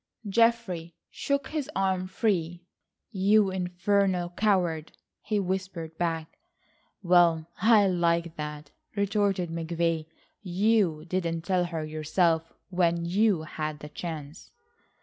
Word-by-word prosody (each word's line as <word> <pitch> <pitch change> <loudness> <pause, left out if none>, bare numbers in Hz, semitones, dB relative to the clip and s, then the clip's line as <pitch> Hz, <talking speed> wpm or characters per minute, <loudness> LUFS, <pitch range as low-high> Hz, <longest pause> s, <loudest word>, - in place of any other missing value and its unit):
Geoffrey 200 -6 +1 0.2
shook 280 -1 -2
his 300 -2 -3
arm 190 -1 0
free. 175 -5 -1 0.5
"You 200 0 +3
infernal 180 0 0
coward," 175 -6 0 0.3
he 210 -1 -1
whispered 185 -4 -3
back. 165 -2 -2 0.6
"Well, 170 -2 +4
I 215 -1 +6
like 170 -2 +1
that," 150 -1 -6 0.2
retorted 200 -3 0
McVay, 165 -1 -1 0.3
"you 190 -4 +1
didn't 170 -2 -2
tell 180 0 +1
her 165 -2 -4
yourself 160 +2 0 0.2
when 170 -2 +1
you 190 -1 +2
had 155 -1 -4
the 150 0 -10
chance." 155 0 -7
175 Hz, 110 wpm, -27 LUFS, 165-195 Hz, 0.6 s, I